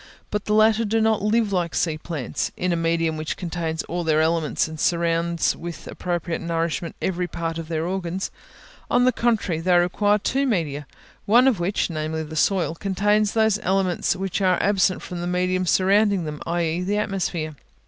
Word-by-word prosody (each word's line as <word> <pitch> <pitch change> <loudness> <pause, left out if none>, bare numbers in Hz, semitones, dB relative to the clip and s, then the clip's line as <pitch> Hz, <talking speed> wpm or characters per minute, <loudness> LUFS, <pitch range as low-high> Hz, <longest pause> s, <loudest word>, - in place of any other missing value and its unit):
But 210 -1 -2
the 210 - +1
latter 220 +1 +4
do 225 +1 +1
not 220 -2 +2
live 215 0 +1
like 175 -3 -1
sea 160 -3 +1
plants, 155 -7 -3
in 180 -1 0
a - - +1
medium 165 -1 0
which 155 0 -4
contains 165 -2 -3
all 175 +1 -3
their 155 -1 +2
elements 160 -1 +1
and 160 -1 -8
surrounds 170 0 +1
with 170 0 -8
appropriate 175 -2 -3
nourishment 170 0 -2
every 180 -1 -1
part 165 -1 -4
of 165 - -6
their 160 -1 -2
organs; 185 0 -3 0.6
on 245 0 +3
the 255 - +5
contrary, 220 -9 0
they 180 +1 +3
require 205 +4 +2
two 270 +6 0
media, 150 - -1 0.4
of 240 0 +5
which 180 +4 0
one, 170 - -7
namely 155 +1 -2
the 160 +1 -8
soil, 175 +1 +1
contains 205 +3 +1
those 220 -2 +3
essential 185 - -4
elements 185 -2 +1
which 195 +1 -3
are 185 -2 +3
absent 195 -2 +2
from 175 -1 -6
the 175 - -3
medium 180 +1 0
surrounding 195 +1 +3
them, 150 -1 -6
i.e. 170 0 0
the 200 +3 -1
atmosphere. 180 -6 -2
175 Hz, 185 wpm, -23 LUFS, 165-200 Hz, 0.6 s, the